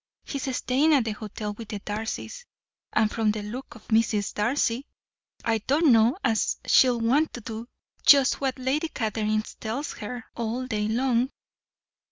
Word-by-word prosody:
He's 270 -2 -3
staying 295 +5 +3
at 265 - +3
the 220 - -1
hotel 210 0 -5
with 225 +1 -9
the 210 - -4
Darcys, 220 - -5 0.5
and 215 -1 +2
from 225 -2 +1
the 210 0 -1
look 240 +6 -7
of 220 - -15
Mrs. 220 -2 +2
Darcy 235 +3 0 0.6
I 225 -1 +2
don't 285 +7 +3
know 230 +6 +5
as 220 -4 +1
she'll 250 -2 +5
want 270 +8 +2
to 240 - -7
do 225 +1 -6 0.4
just 275 -2 +6
what 265 -1 -1
Lady 265 +5 0
Catherine 215 -4 -1 0.2
tells 240 +7 -3
her, 225 +2 -6
all 235 +2 -2
day 210 -4 -1
long." 245 +2 +1
230 Hz, 160 wpm, -26 LUFS, 215-260 Hz, 0.6 s, just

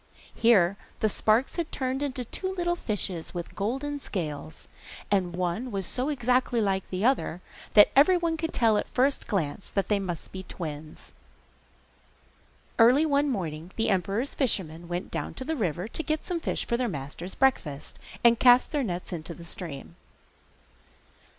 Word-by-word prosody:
Here 200 -5 +4 0.2
the 220 - +3
sparks 220 - +2
had 335 -2 -2
turned 260 0 -2
into 265 -3 -2
two 375 - -4
little 345 -1 0
fishes 190 - -3
with 175 -1 -5
golden 270 +8 -2
scales, 150 - -5 0.4
and 180 -4 +1
one 180 +8 -2
was 195 -4 -3
so 255 - -2
exactly 250 -3 +1
like 195 -3 0
the 185 +3 -1
other 250 -9 +1 0.4
that 210 - +8
everyone 335 +3 +4
could 325 0 -3
tell 225 -3 +3
at - - -2
the - - -25
first 270 +2 +1
glance 185 -4 -2
that 195 -2 -2
they 205 -1 +3
must 180 -4 -5
be 190 - -6
twins. 155 -4 -7 1.7
Early 250 +7 +6
one 290 -1 +2
morning 170 - -4
the 225 -1 +1
emperor's 195 +8 0
fishermen 175 - 0
went 175 +1 -4
down - - -4
to 260 - -5
the 320 +3 -1
river 180 - -2
to - - -3
get 310 0 -2
some 355 -2 -2
fish - - -2
for 235 - 0
their 250 0 0
master's 150 +4 -6
breakfast, 155 - 0 0.2
and 235 -1 +6
cast 245 0 +6
their 295 - 0
nets 180 -4 -4
into 170 0 -5
the 170 - -11
stream. 165 -5 -5
215 Hz, 165 wpm, -27 LUFS, 175-265 Hz, 1.7 s, that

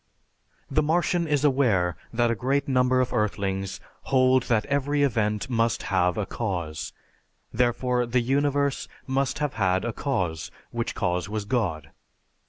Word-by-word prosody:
The 150 +3 +3
Martian 170 +2 +1
is 145 -2 +1
aware 110 - +2 0.2
that 120 0 +2
a - - +2
great 135 +6 0
number 130 -1 +3
of 125 - -2
earthlings 95 -2 -1 0.3
hold 130 -1 +4
that 110 -3 +2
every 145 +1 +1
event 105 -5 0
must 115 -2 0
have 90 0 +2
a 105 - 0
cause, 85 -10 -4 0.6
therefore 125 +1 +1
the 120 +1 +2
Universe 140 +2 0 0.2
must 135 0 0
have 150 -2 -1
had 95 -2 +1
a 120 - -2
cause, 90 - -2 0.2
which 120 -1 -3
cause 90 -1 -1
was 105 -1 -3
God. 85 - -1
120 Hz, 145 wpm, -26 LUFS, 100-135 Hz, 0.6 s, hold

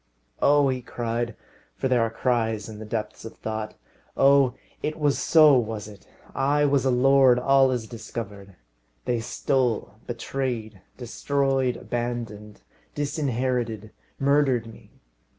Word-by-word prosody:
"Oh!" 145 0 +4
he 130 -1 -2
cried, 120 -1 -3 0.4
for - - -1
there 125 -2 +2
are 115 - +1
cries 115 -3 -1
in 110 -2 -9
the 110 - -7
depths 105 -1 -4
of 115 - -10
thought. 110 -1 -5 0.4
"Oh! 135 -2 +5 0.3
it 155 - -3
was 145 -3 +1
so, 155 -3 +6
was 110 -2 -4
it! 105 -2 -14 0.3
I 145 +2 +2
was 140 -1 +2
a - - +3
lord. 130 0 +5
All 135 +1 +4
is 125 -3 -2
discovered. 105 -4 -8 0.5
They 120 -1 0
stole, 120 -2 -1
betrayed, 120 -4 -4 0.2
destroyed, 135 +1 0
abandoned, 115 -3 -5 0.3
disinherited, 125 -7 -2 0.3
murdered 135 -4 +2
me! 115 -1 -14
120 Hz, 130 wpm, -25 LUFS, 110-135 Hz, 0.5 s, so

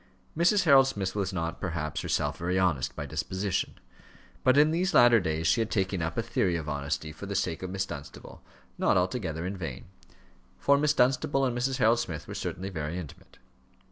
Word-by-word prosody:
Mrs. 180 +5 +3
Harold 135 -5 +6
Smith 100 -8 -3
was 100 -2 -2
not, 85 -2 -4
perhaps, 75 -4 -3
herself - - -1
very 90 +2 -1
honest 70 -9 +1
by - - -5
disposition; 95 0 -2 0.7
but 130 +1 +4
in 150 +1 +5
these 185 +4 0
latter 120 -1 +7
days 80 -3 -2
she 115 - +3
had 110 - -1
taken 95 -4 -1
up 80 +1 -3
a 115 - +1
theory 100 -6 0
of 80 -2 -4
honesty 75 +1 -3
for 80 +6 -9
the 100 - -4
sake 85 -3 -1
of 95 - -4
Miss 95 0 -2
Dunstable 70 -1 -10 0.4
not - - +3
altogether 90 -3 -1
in 95 +2 -3
vain, 80 -9 -6 0.7
for 140 0 +3
Miss 150 0 +2
Dunstable 135 +2 +2
and 125 -2 -1
Mrs. 125 +2 -1
Harold 115 -2 +4
Smith 85 -9 -5
were - - -6
certainly 95 +2 -4
very 80 -1 -4
intimate. 85 -6 -10
95 Hz, 195 wpm, -28 LUFS, 80-125 Hz, 0.7 s, latter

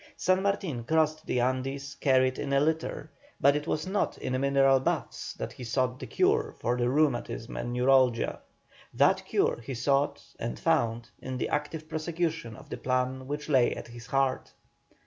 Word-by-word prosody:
San 185 +1 +2
Martin 195 - -1
crossed 155 +3 +1
the 125 - +1
Andes 135 +2 -1
carried 130 -2 +2
in 140 -1 -2
a 140 - +5
litter, 155 0 -1 0.3
but 140 +1 +5
it 150 +1 -2
was 155 -1 -1
not 195 +2 -1
in 130 0 -2
mineral 135 -1 +4
baths 130 - -2
that - - -6
he 125 - -9
sought 125 +2 0
the - - -6
cure - - +1
for 120 +2 0
his 120 -1 0
rheumatism 130 -4 0
and 120 - -3
neuralgia; 125 -1 +3 0.6
that - - +4
cure - - +1
he 125 +3 -5
sought 140 +4 +1 0.2
and - - -3
found 115 - 0
in 130 -1 -4
the - - -2
active 150 +1 -3
prosecution 160 -5 -2
of - - -13
the - - -3
plan 130 +1 -1
which 150 +1 -4
lay 130 -5 +3
at - - -8
his 120 0 -11
heart. 135 -1 0
135 Hz, 175 wpm, -29 LUFS, 125-150 Hz, 0.6 s, a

